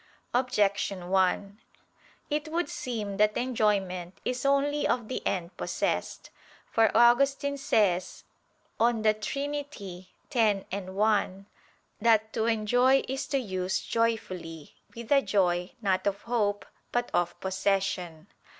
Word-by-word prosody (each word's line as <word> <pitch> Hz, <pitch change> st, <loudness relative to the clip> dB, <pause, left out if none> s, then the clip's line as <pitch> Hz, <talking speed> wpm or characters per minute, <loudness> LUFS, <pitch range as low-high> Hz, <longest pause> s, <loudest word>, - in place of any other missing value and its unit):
Objection 200 Hz, -7 st, 0 dB
1: 195 Hz, +2 st, +1 dB, 0.7 s
It 295 Hz, +1 st, -1 dB
would 330 Hz, +1 st, -1 dB
seem 210 Hz, -5 st, -4 dB
that 210 Hz, 0 st, +3 dB
enjoyment 200 Hz, -7 st, 0 dB
is 250 Hz, +2 st, -1 dB
only 285 Hz, +1 st, +2 dB
of 240 Hz, -3 st, 0 dB
the 255 Hz, -, -3 dB
end 180 Hz, -2 st, -2 dB
possessed. -, -, -2 dB, 0.4 s
For 225 Hz, -1 st, +4 dB
Augustine 275 Hz, +4 st, +4 dB
says 190 Hz, -9 st, +1 dB, 0.6 s
(De 225 Hz, -2 st, +3 dB
Trin. 275 Hz, +7 st, -3 dB, 0.8 s
x, 215 Hz, -5 st, +2 dB
1) 195 Hz, 0 st, 0 dB, 0.6 s
that 220 Hz, -1 st, +3 dB
"to 220 Hz, -, 0 dB
enjoy 245 Hz, +4 st, +3 dB
is 265 Hz, +2 st, -3 dB
to 280 Hz, -, 0 dB
use 190 Hz, -6 st, -2 dB
joyfully, 185 Hz, -9 st, -2 dB, 0.2 s
with 230 Hz, -1 st, -8 dB
the 280 Hz, -1 st, +5 dB
joy, 180 Hz, -5 st, +1 dB
not 190 Hz, -1 st, +1 dB
of 200 Hz, 0 st, -2 dB
hope, 210 Hz, -4 st, 0 dB, 0.3 s
but 240 Hz, 0 st, -1 dB
of 175 Hz, 0 st, 0 dB
possession." 190 Hz, -3 st, -1 dB
215 Hz, 115 wpm, -28 LUFS, 190-245 Hz, 0.8 s, the